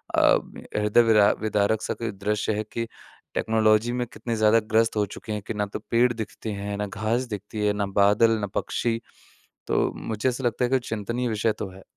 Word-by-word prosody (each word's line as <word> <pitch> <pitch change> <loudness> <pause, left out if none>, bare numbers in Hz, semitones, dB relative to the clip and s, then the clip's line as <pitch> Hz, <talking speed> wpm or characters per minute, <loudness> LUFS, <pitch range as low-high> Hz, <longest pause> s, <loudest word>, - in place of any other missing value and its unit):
अ, - - +5
में - - -12 0.2
हृदय 105 +2 +4
विरा 105 -3 +5
विदारक 105 0 +1
सा - - -2
कोई 115 -2 -4
दृश्य 105 +2 -1
है 110 - -1
कि, 115 +2 -4 0.5
टेक्नोलॉजी 110 +1 +2
में 125 0 -1
कितने 115 0 -4
ज़्यादा 110 +1 +5
ग्रस्त 110 0 +3
हो 105 -1 +2
चुके 110 - -8
हैं 105 - -3
कि - - -2
ना 105 -1 -1
तो - - -3
पेड़ 120 +1 +4
दिखते 110 -1 -6
हैं, 100 0 -4
ना 105 - -1
घास 110 +5 -1
दिखती 105 +1 -5
है, 105 - +3
ना 100 -1 -1 0.2
बादल, 105 +3 +5
ना 105 - -2
पक्षी। 115 -1 -1 0.7
तो - - +1
मुझे 110 +3 -1
ऐसा 125 +1 -4
लगता 120 +1 +1
है - - -2
कि 130 - +4
चिंतनीय 115 +3 -2
विषय 110 0 +1
तो - - -2
है। 95 +1 -14
110 Hz, 210 wpm, -25 LUFS, 105-115 Hz, 0.7 s, अ